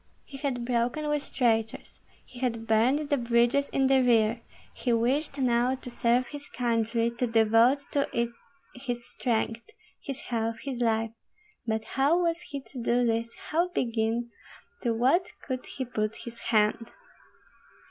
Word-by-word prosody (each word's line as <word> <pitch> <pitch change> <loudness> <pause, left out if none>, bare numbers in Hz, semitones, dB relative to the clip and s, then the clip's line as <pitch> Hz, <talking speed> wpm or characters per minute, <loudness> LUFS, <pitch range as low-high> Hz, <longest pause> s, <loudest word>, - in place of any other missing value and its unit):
He 275 - -10
had 265 -4 -2
broken 245 +5 0
with 295 -1 -2
traitors, 225 -3 0 0.3
he 245 - -13
had 230 -3 -1
burned 245 +7 +2
the 285 - +3
bridges 240 +3 +2
in 270 - +1
the 265 0 +5
rear, 230 -2 +3 0.3
he 245 - -2
wished 265 +6 +1
now 250 -1 +2
to 255 -1 -9
serve 240 +1 +1
his 290 -1 -7
country, 230 -1 0
to 250 - +2
devote 225 +4 +4
to 280 -1 +1
it 235 0 0 0.4
his 245 -2 -5
strength, 230 -1 -1 0.4
his 275 -2 -5
health, 230 -1 -2
his 260 -3 -4
life; 225 -1 +1 0.6
but 220 0 0
how 275 +8 +2
was 340 -1 0
he 280 -1 -6
to 260 -1 -9
do 240 +1 +2
this, 230 0 0 0.2
how 335 +3 +2
begin, 235 -5 -1 0.5
to 240 - +1
what 270 +11 +3 0.2
could 255 -2 -4
he 260 - -4
put 215 -3 -2
his 235 -1 -8
hand? 220 +1 +2
240 Hz, 155 wpm, -28 LUFS, 230-270 Hz, 0.6 s, the